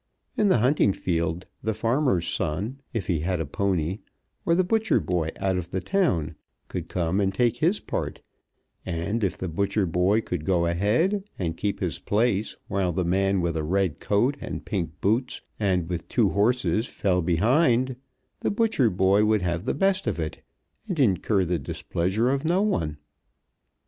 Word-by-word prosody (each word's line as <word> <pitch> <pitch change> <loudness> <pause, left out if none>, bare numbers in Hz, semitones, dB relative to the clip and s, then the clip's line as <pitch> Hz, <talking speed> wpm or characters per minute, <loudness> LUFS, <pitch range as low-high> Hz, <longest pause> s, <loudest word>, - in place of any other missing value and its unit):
In 210 - +3
the 190 - +4
hunting 125 -3 +3
field 85 0 -2 0.2
the 110 -1 -1
farmer's 115 - +1
son, 100 - -2
if 115 -4 -3
he 85 -5 0
had 90 +3 -1
a 80 - -1
pony, 90 +3 -1 0.5
or 170 - +4
the 185 - +3
butcher 220 +4 +2
boy 85 -3 -1
out 95 -1 +1
of 85 -1 -4
the 95 - -2
town, 90 - 0 0.4
could - - -5
come 90 +2 0
and 95 -1 +1
take 120 +3 +1
his 175 +10 +2
part; - - -4 0.6
and 95 +6 -2
if 95 - 0
the 95 - -4
butcher 100 +4 0
boy 90 +6 +2
could 90 -7 -4
go 85 0 +2
ahead 110 - +1
and 85 -3 -2
keep 100 +3 -2
his 90 -4 -1
place 110 -1 0
while 95 -3 0
the 90 +1 -1
man 95 +2 +2
with 85 -1 -1
a 80 - -1
red 90 0 0
coat 120 +8 +1
and - - -6
pink 85 -6 -3
boots 115 +6 0 0.2
and 95 -5 +1
with 85 -1 -4
two - - +2
horses 115 +2 +1
fell 90 -3 0
behind, 120 - +2 0.4
the - - 0
butcher 205 - +2
boy 95 +2 +3
would 105 -2 +2
have 85 +1 -1
the - - 0
best 195 +4 +1
of - - -1
it, 80 -1 -4 0.5
and 185 -6 -3
incur 100 -4 +2
the 85 0 0
displeasure 100 +9 -1
of 140 +1 -1
no 175 +5 +2
one. 80 - -1
100 Hz, 175 wpm, -25 LUFS, 85-120 Hz, 0.6 s, the